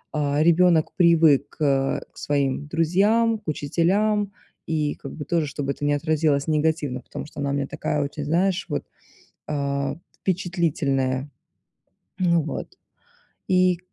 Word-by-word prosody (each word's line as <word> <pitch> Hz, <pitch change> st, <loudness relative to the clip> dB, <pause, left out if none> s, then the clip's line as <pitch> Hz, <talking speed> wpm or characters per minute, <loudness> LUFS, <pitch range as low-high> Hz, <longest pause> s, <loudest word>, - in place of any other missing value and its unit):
а, 145 Hz, -1 st, +1 dB
ребенок 170 Hz, -1 st, +4 dB
привык, 165 Hz, -5 st, +4 dB
э, 135 Hz, -3 st, +1 dB
к -, -, -24 dB
своим 140 Hz, 0 st, -1 dB
друзьям, 205 Hz, +8 st, +2 dB
к 210 Hz, -, -35 dB
учителям, 195 Hz, +8 st, +1 dB, 0.4 s
и 155 Hz, -2 st, 0 dB
как -, -, -9 dB
бы 150 Hz, -, -7 dB
тоже, 165 Hz, 0 st, 0 dB
чтобы 140 Hz, 0 st, -3 dB
это -, -, -10 dB
не 145 Hz, -, +2 dB
отразилось 150 Hz, -1 st, +1 dB
негативно, 150 Hz, -4 st, 0 dB
потому -, -, -8 dB
что 150 Hz, -, -11 dB
она 140 Hz, -, -1 dB
у -, -, -1 dB
меня 140 Hz, 0 st, 0 dB
такая 150 Hz, -, -2 dB
очень, 145 Hz, +1 st, -5 dB
знаешь 180 Hz, +5 st, +1 dB
вот, 145 Hz, -, -2 dB, 0.7 s
а, 140 Hz, -1 st, -1 dB, 0.2 s
впечатлительная. 150 Hz, -8 st, 0 dB, 0.9 s
Ну 170 Hz, -2 st, +3 dB
вот, -, -, -6 dB, 0.7 s
и, 185 Hz, -1 st, +3 dB
155 Hz, 140 wpm, -24 LUFS, 140-175 Hz, 0.9 s, ребенок